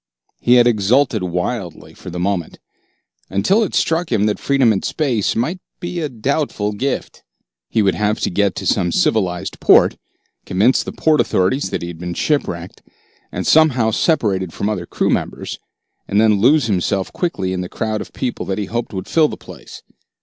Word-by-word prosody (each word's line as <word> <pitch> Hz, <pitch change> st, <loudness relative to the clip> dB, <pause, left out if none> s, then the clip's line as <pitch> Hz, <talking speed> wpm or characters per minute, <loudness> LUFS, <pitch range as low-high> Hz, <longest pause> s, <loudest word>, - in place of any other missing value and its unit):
He 120 Hz, -, +4 dB
had 120 Hz, -1 st, +6 dB
exulted 120 Hz, +1 st, +2 dB
wildly 90 Hz, +2 st, -4 dB
for -, -, -10 dB
a 90 Hz, -, -6 dB
moment, 90 Hz, -2 st, -2 dB, 0.7 s
until 140 Hz, -, +2 dB
it 210 Hz, -, -1 dB
struck 165 Hz, +1 st, 0 dB
him 105 Hz, -3 st, +2 dB
that 105 Hz, -1 st, 0 dB
freedom 135 Hz, -5 st, +3 dB
in 95 Hz, -, -2 dB
space 125 Hz, -10 st, 0 dB
might 155 Hz, +11 st, -1 dB, 0.2 s
be 175 Hz, 0 st, -4 dB
a 155 Hz, -3 st, -2 dB
doubtful 125 Hz, -3 st, -1 dB
gift. 130 Hz, +7 st, -3 dB, 0.5 s
He 110 Hz, -, +2 dB
would 95 Hz, -, +3 dB
have 105 Hz, 0 st, 0 dB
to -, -, 0 dB
get 100 Hz, +1 st, +1 dB
to -, -, -5 dB
some 90 Hz, -4 st, +1 dB
civilized 90 Hz, -4 st, 0 dB
port, -, -, +5 dB, 0.5 s
convince 105 Hz, +8 st, +2 dB
the -, -, -6 dB
port 155 Hz, -1 st, +2 dB
authorities 95 Hz, +10 st, 0 dB
that -, -, -3 dB
he -, -, -4 dB
had 85 Hz, -2 st, -9 dB
been 90 Hz, 0 st, -5 dB
shipwrecked 90 Hz, -, -2 dB, 0.5 s
and -, -, -4 dB
somehow 130 Hz, -8 st, +4 dB
separated 100 Hz, -, 0 dB
from -, -, -4 dB
the 105 Hz, -, +1 dB
other 90 Hz, -4 st, -5 dB
crew -, -, 0 dB
members, -, -, -3 dB, 0.5 s
and 100 Hz, -, +1 dB
then 110 Hz, -2 st, +4 dB
lose 145 Hz, +4 st, +4 dB
himself 95 Hz, -2 st, -1 dB
quickly 95 Hz, -, -2 dB
in 90 Hz, -, -2 dB
the 90 Hz, -, -5 dB
crowd 110 Hz, -1 st, -3 dB
of -, -, -9 dB
people 125 Hz, -2 st, -3 dB
that 95 Hz, -, -2 dB
he 105 Hz, -, -2 dB
hoped 115 Hz, 0 st, -4 dB
would 95 Hz, 0 st, -5 dB
fill 160 Hz, -2 st, +3 dB
the -, -, -7 dB
place. -, -, -12 dB
110 Hz, 185 wpm, -19 LUFS, 95-135 Hz, 0.7 s, had